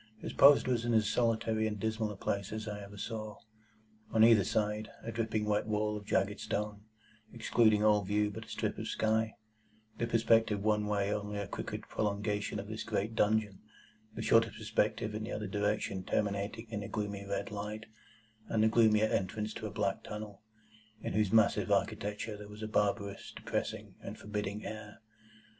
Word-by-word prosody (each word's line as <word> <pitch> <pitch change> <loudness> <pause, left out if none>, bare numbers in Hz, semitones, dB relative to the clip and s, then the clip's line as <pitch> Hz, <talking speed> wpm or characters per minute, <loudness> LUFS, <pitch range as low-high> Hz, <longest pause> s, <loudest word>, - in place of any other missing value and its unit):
His - - -6
post 140 -1 +7
was 120 -3 +1
in 120 -1 +1
as 110 -2 +4
solitary 110 -1 +1
and 105 -1 -4
dismal 110 +1 -1
a - - -7
place 100 0 -2
as 110 0 -4
ever 105 -1 -6
I - - -12
saw. 110 0 -5 0.7
On 110 - +4
either 115 -3 +7
side, 105 +2 -1
a 115 - -4
dripping 110 -1 -1
wet 105 0 +1
wall 105 0 0
of 105 -1 -7
jagged 100 +2 +1
stone, 105 -1 -3 0.5
excluding 110 -2 +3
all 105 -1 +5
view 105 +2 +1
but - - -7
a - - -16
strip - - -2
of - - -4
sky; 110 0 +1 0.6
the 120 - 0
perspective 115 -2 +3
one 105 -1 +2
way 100 -1 +1
only 105 0 -3
a 100 -1 -3
crooked - - -5
prolongation 105 0 -1
of 100 - -6
this 110 +1 -5
great 110 0 -1
dungeon; 105 -3 +2 0.6
the - - -4
shorter 115 0 +5
perspective 105 +1 -1
in 110 0 -3
the - - -5
other 105 - -3
direction 100 -1 -1
terminating 100 +3 -1
in 105 -2 -3
a 100 - -5
gloomy 100 -1 -3
red 100 +2 -3
light, 105 +1 -5 0.6
and 110 -1 +2
the 110 - +5
gloomier 110 -1 +5
entrance 105 +1 -1
to 110 - -5
a - - -5
black 100 -2 -1
tunnel, 105 -2 -7 0.6
in - - -2
whose 105 -2 +2
massive 110 -1 +4
architecture 105 +1 0
there 105 0 -9
was 105 +1 -9
a - - -2
barbarous, 100 -1 -1
depressing, - - -3
and - - -7
forbidding 105 0 -4
air. 105 -1 -7
105 Hz, 180 wpm, -33 LUFS, 105-110 Hz, 0.7 s, post